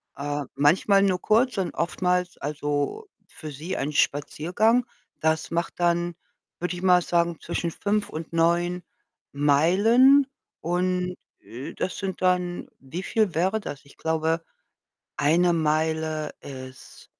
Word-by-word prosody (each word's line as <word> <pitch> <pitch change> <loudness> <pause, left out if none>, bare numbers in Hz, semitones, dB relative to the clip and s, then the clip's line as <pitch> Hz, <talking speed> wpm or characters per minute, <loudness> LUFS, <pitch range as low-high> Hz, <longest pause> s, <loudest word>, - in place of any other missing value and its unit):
äh, 145 +1 -3
manchmal 190 +7 +4
nur 185 -2 +1
kurz 225 +1 +2
und 185 -3 -1
oftmals 180 +1 -1
also, 145 - -3 0.2
für 155 -2 -9
sie 155 +6 -5
ein 145 +2 -2
Spaziergang. 180 - +1 0.3
Das 160 +1 0
macht 170 +1 -1
dann, 175 0 +1 0.4
würde 180 +1 -2
ich 175 - -7
mal 180 -1 +5
sagen, 170 -1 0
zwischen 170 0 -2
5 205 +3 -1
und 160 +1 -7
9 175 +1 +1 0.5
Meilen. 205 - +5 0.3
Und, 180 +1 -1 0.3
äh, 135 +8 -8
das 185 - -3
sind 195 -3 -4
dann 180 -1 0
wie 160 +8 -6
viel 215 -6 +1
wäre 190 +6 +1
das? 145 -8 -8
Ich 140 - -19
glaube, 160 +1 0 0.7
1 170 +4 +3
Meile 155 -1 0
ist 130 -1 -11
170 Hz, 130 wpm, -25 LUFS, 155-185 Hz, 0.7 s, mal